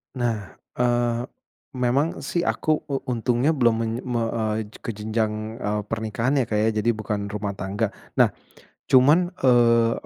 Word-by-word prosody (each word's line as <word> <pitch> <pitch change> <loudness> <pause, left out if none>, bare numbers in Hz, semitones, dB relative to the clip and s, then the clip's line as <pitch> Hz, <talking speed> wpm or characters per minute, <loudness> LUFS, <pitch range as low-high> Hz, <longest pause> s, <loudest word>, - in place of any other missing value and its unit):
Nah, 115 -8 -2 0.2
eee, 120 -1 +2 0.5
memang 125 +4 +2 0.2
sih 170 - -1
aku - - -1 0.2
u 140 - -2 0.2
untungnya 120 +5 +1
belum 120 -6 +3
men 115 - -1 0.2
me 120 - +1 0.2
eee, 110 -1 -3
ke - - -1
jenjang, 110 +1 -2
eee, 105 0 -1
pernikahan 110 +5 0
ya 125 - +2
Kak 110 - -2
ya, 110 - +3
jadi 115 - +1
bukan 105 -1 -3
rumah 100 0 -3
tangga. 100 +3 -2 0.2
Nah, - - +5 0.6
cuman, 150 +8 +5
eee, 115 -2 +4
115 Hz, 150 wpm, -24 LUFS, 110-125 Hz, 0.6 s, Nah